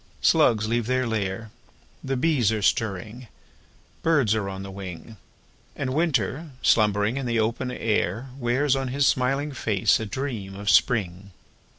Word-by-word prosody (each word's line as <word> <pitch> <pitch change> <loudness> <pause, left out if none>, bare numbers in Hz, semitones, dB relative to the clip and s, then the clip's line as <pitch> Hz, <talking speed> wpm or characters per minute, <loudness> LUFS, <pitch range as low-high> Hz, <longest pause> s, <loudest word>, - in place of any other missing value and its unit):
Slugs 110 -2 +3
leave 115 0 0
their 130 0 +1
lair— 110 -1 -3 0.5
The 135 0 -2
bees 130 -6 +2
are 110 -2 -2
stirring—birds 110 - -2
are 105 -3 -1
on 95 0 -6
the 100 - -8
wing— 95 +2 -9 0.6
And 130 -2 -3
Winter, 150 - 0
slumbering 105 +2 +3
in 135 -2 -3
the 115 -1 +1
open 115 +3 -1
air, 115 0 -1
Wears 130 +3 +1
on 135 -1 -2
his 140 +2 +1
smiling 135 +4 +1
face 110 -7 +1
a 110 - -4
dream 105 -5 -4
of 100 +1 0
Spring! 100 -5 +1
115 Hz, 145 wpm, -25 LUFS, 100-130 Hz, 0.6 s, Slugs